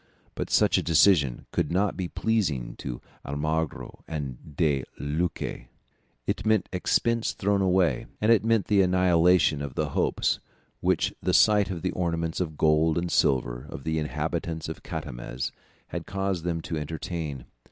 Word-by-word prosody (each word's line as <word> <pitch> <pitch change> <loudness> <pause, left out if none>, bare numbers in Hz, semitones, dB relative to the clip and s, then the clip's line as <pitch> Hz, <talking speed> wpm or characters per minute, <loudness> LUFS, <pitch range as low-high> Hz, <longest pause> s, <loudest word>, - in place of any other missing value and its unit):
But - - -4
such - - +4
a - - 0
decision 80 -5 +4
could 75 - 0
not 95 +3 +1
be 90 - -3
pleasing 85 - -1
to - - -5 0.2
Almagro 75 +2 -3
and 70 -2 -6
De 70 -5 +2 0.2
Luque. 75 -4 -2 0.6
It - - -1
meant 110 -2 +2
expense 115 +5 +1
thrown 100 0 +1
away; 90 -8 +2
and 110 +2 +3
it 115 - +5
meant 115 -2 +2
the 100 -2 +4
annihilation 90 -4 +4
of 70 -3 -5
the - - -1
hopes - - +1 0.4
which - - +1
the - - +1
sight 105 -2 +5
of 90 -3 -5
the 90 - 0
ornaments 85 -1 -1
of 80 -4 -3
gold 80 +1 +3
and 85 0 -1
silver 60 0 +1
of 70 - -8
the 80 +1 0
inhabitants 80 +1 -3
of 80 - -6
Catamez - - -5 0.4
had - - -5
caused 95 -3 -2
them 85 -2 -1
to 85 -1 -4
entertain. 75 -2 -5
80 Hz, 155 wpm, -27 LUFS, 75-95 Hz, 0.6 s, it